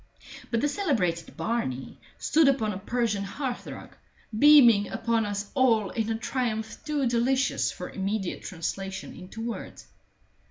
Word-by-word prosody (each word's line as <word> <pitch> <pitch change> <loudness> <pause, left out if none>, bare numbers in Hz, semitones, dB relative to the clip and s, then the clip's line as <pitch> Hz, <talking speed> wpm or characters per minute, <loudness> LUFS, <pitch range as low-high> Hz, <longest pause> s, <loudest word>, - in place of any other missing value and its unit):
But 230 -1 0
the 290 - +2
celebrated 220 - -1
Barney 135 - -3 0.2
stood 315 -1 +3
upon 225 -6 +2
a 185 - -5
Persian 215 -1 -1
hearth 245 +5 -4
rug, - - -9 0.4
beaming 240 -8 +7
upon 225 -2 0
us 205 0 -4
all 230 -7 +3
in 225 -1 -2
a 225 - 0
triumph 225 -2 -2
too 295 -2 0
delicious 255 +3 +1
for - - -7
immediate 195 -1 -3
translation 190 +3 -5
into 190 +5 -9
words. 235 - -6
225 Hz, 135 wpm, -27 LUFS, 200-260 Hz, 0.4 s, beaming